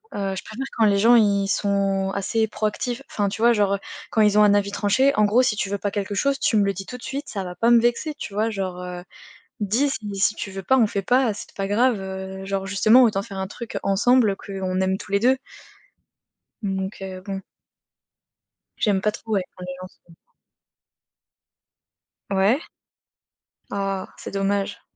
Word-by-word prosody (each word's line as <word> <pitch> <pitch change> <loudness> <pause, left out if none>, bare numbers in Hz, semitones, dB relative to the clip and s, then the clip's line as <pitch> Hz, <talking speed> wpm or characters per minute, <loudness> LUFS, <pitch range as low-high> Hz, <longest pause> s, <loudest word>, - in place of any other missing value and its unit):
Heu, 195 -1 -2
je - - -5
préfère 260 +5 -6
quand 225 - +4
les 200 -1 +3
gens 235 +4 +6
ils 200 -3 +3
sont 195 -1 0
assez 220 +3 0
proactifs, 235 +4 -2
enfin, 205 -1 0
tu 220 - -6
vois? 235 +1 +6
Genre, 205 -3 +2
heu, - - -6 0.3
quand 220 - +2
ils 210 -1 +4
ont 210 - +7
un 205 -1 +5
avis 200 -1 +2
tranché, 230 +8 +2
en 210 - +4
gros 220 +5 +4
si 250 -4 +1
tu 195 - -2
veux 200 - -2
pas 205 - -1
quelque 200 0 -3
chose, 275 +7 +1
tu 230 - +1
me 205 - +4
le 200 0 +1
dis 195 +1 -7
tout 250 - -7
de - - -17
suite, 280 +2 -5
ça 195 -3 -4
va 180 -1 -7
pas 230 +6 +2
me 240 - +7
vexer, 240 +6 0
tu 260 -8 -8
vois 220 +2 +1
genre, 190 -3 -4
heu. 180 -1 -6 0.6
Dis, 225 +8 +1
si 220 -5 -5
si 210 - +3
tu 200 - -5
veux 195 0 -6
pas, 265 +8 +3
on 230 - +5
fait 200 - -2
pas, 245 +2 +2
c'est 210 - -8
t - - -23
pas 195 - -2
grave, 230 +3 +2
heu. 190 0 -6
Genre 195 0 -2
justement 215 +6 +5
autant 210 -4 +1
faire 200 -2 -8
un 190 - -2
truc 225 +3 -6
ensemble, 225 +4 +3
heu, - - -6
qu'on 190 -2 -4
aime 190 0 0
tous - - -11
les 200 - +3
2. 260 +4 +3 1.2
Donc, 190 0 -3
heu, 190 -1 -6
bon. 195 -1 -4 1.4
J'aime 200 -3 +2
pas 210 +2 +1
trop 220 +1 -8
ouais, 195 - +2
quand 180 - -8
les 180 - -5
gens 185 - -7 0.2
sont 170 - -17 2.2
Ouais. 200 - +2 1.1
Ah, 195 -1 -2
c'est - - -7
dommage. 200 0 -1
200 Hz, 210 wpm, -23 LUFS, 195-225 Hz, 2.2 s, ont